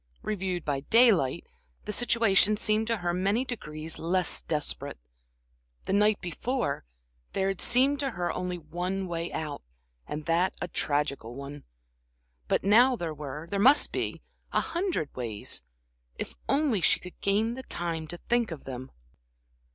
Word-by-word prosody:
Reviewed 190 Hz, -4 st, -2 dB
by 140 Hz, -2 st, 0 dB
daylight, 195 Hz, -, +4 dB, 0.4 s
the 210 Hz, -, -3 dB
situation 215 Hz, -3 st, +4 dB
seemed 215 Hz, +1 st, +2 dB
to 230 Hz, -1 st, +1 dB
her 175 Hz, -2 st, -1 dB
many 200 Hz, +8 st, +1 dB
degrees 155 Hz, -10 st, -5 dB
less 180 Hz, +2 st, 0 dB
desperate. 150 Hz, -2 st, -2 dB, 0.9 s
The -, -, -1 dB
night 210 Hz, +1 st, +4 dB
before, 180 Hz, -, -2 dB, 0.5 s
there 195 Hz, 0 st, +1 dB
had 195 Hz, -, -3 dB
seemed 270 Hz, +3 st, +4 dB
to 275 Hz, -1 st, 0 dB
her 180 Hz, -7 st, -2 dB
only 180 Hz, 0 st, -3 dB
one 180 Hz, +4 st, -3 dB
way 170 Hz, -1 st, -3 dB
out, 150 Hz, -2 st, -4 dB, 0.5 s
and 150 Hz, 0 st, -5 dB
that 170 Hz, +3 st, +2 dB
a -, -, -2 dB
tragical 145 Hz, -7 st, -1 dB
one; 140 Hz, +1 st, -8 dB, 0.8 s
but -, -, +1 dB
now 240 Hz, +6 st, +6 dB
there 170 Hz, -7 st, -3 dB
were 150 Hz, +1 st, -6 dB
there 200 Hz, -, 0 dB
must 265 Hz, +8 st, +6 dB
be -, -, -3 dB, 0.3 s
a -, -, +3 dB
hundred 340 Hz, -, -2 dB
ways, 115 Hz, -5 st, -3 dB, 0.6 s
if -, -, -4 dB, 0.2 s
only 275 Hz, -9 st, +2 dB
she -, -, +4 dB
could 180 Hz, -, -12 dB
gain 210 Hz, +4 st, +2 dB
the 260 Hz, -, -6 dB
time 165 Hz, -8 st, -3 dB
to 175 Hz, -, -4 dB
think 235 Hz, +4 st, +1 dB
of 165 Hz, -4 st, -7 dB
them. 130 Hz, 0 st, -7 dB
180 Hz, 150 wpm, -28 LUFS, 155-225 Hz, 0.9 s, now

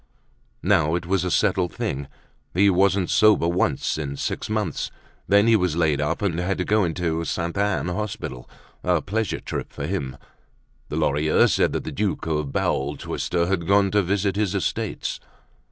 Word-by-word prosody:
Now 85 Hz, -5 st, +3 dB
it 85 Hz, 0 st, -3 dB
was 95 Hz, 0 st, +1 dB
a 90 Hz, -, -1 dB
settled 90 Hz, +1 st, +1 dB
thing. 70 Hz, 0 st, -3 dB, 0.5 s
He 100 Hz, +2 st, +5 dB
wasn't 95 Hz, 0 st, +2 dB
sober 105 Hz, -6 st, +5 dB
once 85 Hz, -4 st, 0 dB
in 70 Hz, -2 st, -4 dB
six 90 Hz, -, -3 dB
months; 110 Hz, -1 st, -2 dB, 0.4 s
then 100 Hz, +1 st, +5 dB
he 115 Hz, -1 st, +5 dB
was 90 Hz, -6 st, +1 dB
laid 75 Hz, -4 st, +2 dB
up 80 Hz, +6 st, -1 dB
and 85 Hz, -4 st, 0 dB
had 90 Hz, +2 st, -1 dB
to -, -, -1 dB
go 105 Hz, 0 st, +3 dB
into 85 Hz, -1 st, -1 dB
the 85 Hz, -, -3 dB
Sainte 85 Hz, +2 st, -2 dB
Anne 100 Hz, -7 st, 0 dB
hospital; 90 Hz, -10 st, -4 dB, 0.3 s
a 90 Hz, -2 st, +2 dB
pleasure 110 Hz, +2 st, -2 dB
trip -, -, -5 dB
for 70 Hz, -, -5 dB
him. 70 Hz, -7 st, -3 dB, 0.7 s
The -, -, -4 dB
Lorilleuxs 75 Hz, +2 st, +3 dB
said -, -, +2 dB
that -, -, -2 dB
the -, -, -5 dB
Duke 105 Hz, -1 st, -2 dB
of 75 Hz, -3 st, -1 dB
Bowel 70 Hz, +2 st, -1 dB
Twister 85 Hz, +4 st, -1 dB
had 85 Hz, -2 st, -1 dB
gone 100 Hz, -1 st, +4 dB
to 105 Hz, -, +3 dB
visit 100 Hz, +1 st, 0 dB
his 105 Hz, -3 st, 0 dB
estates. -, -, -2 dB
90 Hz, 180 wpm, -24 LUFS, 80-100 Hz, 0.7 s, He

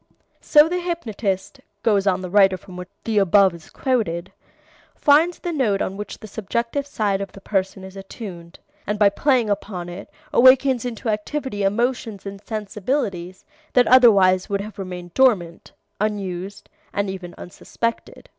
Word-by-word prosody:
'" -, -, -43 dB
"So 300 Hz, 0 st, +8 dB
the 360 Hz, +2 st, -1 dB
hypnotist," 240 Hz, -, -3 dB, 0.2 s
goes 205 Hz, -3 st, +2 dB
on 185 Hz, -1 st, +2 dB
the 185 Hz, -, -5 dB
writer 195 Hz, -2 st, +5 dB
from 185 Hz, 0 st, -14 dB
which 180 Hz, 0 st, -8 dB
the 220 Hz, -2 st, +1 dB
above 195 Hz, 0 st, +4 dB
is 165 Hz, -2 st, -13 dB
quoted, 200 Hz, -10 st, -2 dB, 0.6 s
"finds 315 Hz, +4 st, +4 dB
the 350 Hz, -, -4 dB
note 240 Hz, -11 st, +1 dB
on 190 Hz, -, -2 dB
which 210 Hz, 0 st, -7 dB
the 215 Hz, -, -11 dB
subjective 235 Hz, +7 st, -3 dB
side 205 Hz, -8 st, -1 dB
of 195 Hz, -, -6 dB
the -, -, -11 dB
person 195 Hz, -1 st, -2 dB
is 190 Hz, 0 st, -10 dB
attuned, 195 Hz, -3 st, -9 dB, 0.3 s
and 210 Hz, +1 st, -1 dB
by 205 Hz, -1 st, +5 dB
playing 250 Hz, +2 st, +1 dB
upon 190 Hz, -3 st, -4 dB
it 175 Hz, +3 st, -9 dB, 0.2 s
awakens 260 Hz, -1 st, +5 dB
into 235 Hz, -1 st, -5 dB
activity 215 Hz, +1 st, -3 dB
emotions 225 Hz, 0 st, -1 dB
and 195 Hz, 0 st, -7 dB
sensibilities 205 Hz, -4 st, -3 dB, 0.3 s
that 250 Hz, -1 st, +5 dB
otherwise 200 Hz, -8 st, +5 dB
would 200 Hz, -1 st, -1 dB
have 210 Hz, 0 st, -9 dB
remained 180 Hz, -2 st, -7 dB
dormant, 195 Hz, -11 st, +1 dB, 0.3 s
unused 200 Hz, -2 st, -4 dB, 0.2 s
and 200 Hz, 0 st, -1 dB
even 185 Hz, -2 st, -7 dB
unsuspected." 230 Hz, +6 st, -5 dB
205 Hz, 155 wpm, -22 LUFS, 190-240 Hz, 0.6 s, So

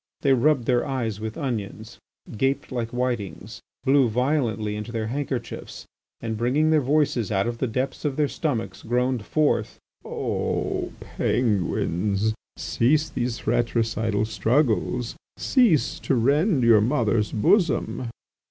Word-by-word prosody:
They 135 Hz, -2 st, +4 dB
rubbed 130 Hz, 0 st, +3 dB
their 120 Hz, -1 st, +2 dB
eyes 120 Hz, -7 st, -2 dB
with 110 Hz, 0 st, -5 dB
onions, 115 Hz, -8 st, -4 dB, 0.4 s
gaped 135 Hz, +6 st, 0 dB
like 120 Hz, -3 st, -2 dB
whitings, 120 Hz, -, -3 dB, 0.2 s
blew 135 Hz, -2 st, +4 dB
violently 115 Hz, -4 st, 0 dB
into 105 Hz, +2 st, -6 dB
their 115 Hz, -2 st, -2 dB
handkerchiefs, 130 Hz, 0 st, -4 dB, 0.3 s
and, 110 Hz, -1 st, -3 dB
bringing 145 Hz, +7 st, +2 dB
their 155 Hz, -1 st, +4 dB
voices 135 Hz, -6 st, +1 dB
out 95 Hz, -1 st, +1 dB
of 120 Hz, 0 st, -3 dB
the 130 Hz, -, 0 dB
depths 130 Hz, +4 st, -3 dB
of 145 Hz, -3 st, -1 dB
their 150 Hz, 0 st, +2 dB
stomachs, 140 Hz, -7 st, -3 dB
groaned 125 Hz, 0 st, 0 dB
forth: 155 Hz, +7 st, 0 dB, 0.3 s
"O -, -, -2 dB
Penguins, 105 Hz, -1 st, 0 dB, 0.2 s
cease 150 Hz, +6 st, +1 dB
these 120 Hz, -1 st, -2 dB
fratricidal 110 Hz, -2 st, 0 dB
struggles; 115 Hz, +2 st, 0 dB, 0.2 s
cease 230 Hz, -, +2 dB
to 135 Hz, -, 0 dB
rend 140 Hz, -, +2 dB
your 115 Hz, -3 st, +6 dB
mother's 110 Hz, -3 st, +1 dB
bosom!" 130 Hz, -, +1 dB
120 Hz, 125 wpm, -24 LUFS, 110-140 Hz, 0.4 s, your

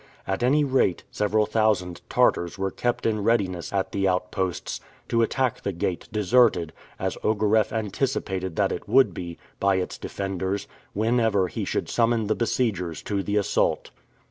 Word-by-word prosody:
At 95 Hz, +3 st, -2 dB
any 140 Hz, +5 st, +4 dB
rate, 130 Hz, -10 st, +1 dB
several 105 Hz, +1 st, +1 dB
thousand 105 Hz, -5 st, +1 dB
Tartars 85 Hz, +1 st, +2 dB
were 95 Hz, 0 st, -1 dB
kept 120 Hz, 0 st, -1 dB
in 110 Hz, -2 st, +1 dB
readiness 95 Hz, -6 st, 0 dB
at 100 Hz, -1 st, -1 dB
the 100 Hz, -1 st, +1 dB
outposts, 90 Hz, 0 st, -2 dB, 0.3 s
to 115 Hz, -, +2 dB
attack 125 Hz, +1 st, 0 dB
the 100 Hz, -, -2 dB
gate, 85 Hz, 0 st, -3 dB
deserted, 105 Hz, -5 st, +3 dB, 0.2 s
as -, -, -3 dB
Ogareff 110 Hz, 0 st, +2 dB
anticipated 100 Hz, -5 st, -2 dB
that -, -, +2 dB
it -, -, -5 dB
would 130 Hz, -8 st, +5 dB
be, 85 Hz, -1 st, -6 dB, 0.2 s
by 100 Hz, 0 st, +3 dB
its 95 Hz, -1 st, -3 dB
defenders, 95 Hz, 0 st, -3 dB, 0.3 s
whenever 110 Hz, -3 st, +2 dB
he -, -, -3 dB
should -, -, -2 dB
summon 115 Hz, -1 st, +2 dB
the 110 Hz, -, +1 dB
besiegers 95 Hz, -, -1 dB
to 100 Hz, -2 st, -1 dB
the 105 Hz, +2 st, -1 dB
assault. 105 Hz, 0 st, +1 dB
100 Hz, 155 wpm, -25 LUFS, 95-115 Hz, 0.3 s, would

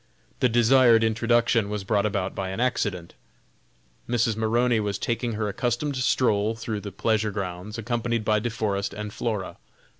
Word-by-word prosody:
The 125 Hz, -, +3 dB
desired 120 Hz, 0 st, +5 dB
introduction 115 Hz, -1 st, +2 dB
was 105 Hz, -1 st, -3 dB
brought 105 Hz, +1 st, +1 dB
about 100 Hz, -2 st, -2 dB
by 95 Hz, -1 st, -4 dB
an 95 Hz, -, -5 dB
accident. 100 Hz, -8 st, -1 dB, 1.0 s
Mrs. 115 Hz, -2 st, +1 dB
Maroney 115 Hz, +2 st, +2 dB
was 100 Hz, -2 st, -2 dB
taking 120 Hz, +2 st, -2 dB
her 105 Hz, 0 st, -2 dB
accustomed 120 Hz, +7 st, -1 dB
stroll 115 Hz, -4 st, +1 dB
through 110 Hz, -2 st, -4 dB
the 100 Hz, 0 st, -7 dB
pleasure 110 Hz, +2 st, 0 dB
grounds, 100 Hz, +1 st, -5 dB
accompanied 115 Hz, 0 st, -2 dB
by 105 Hz, -1 st, +3 dB
De 120 Hz, +3 st, -2 dB
Forest 100 Hz, -3 st, -2 dB
and 105 Hz, 0 st, -6 dB
Flora. 105 Hz, -5 st, -3 dB
110 Hz, 155 wpm, -25 LUFS, 100-120 Hz, 1.0 s, desired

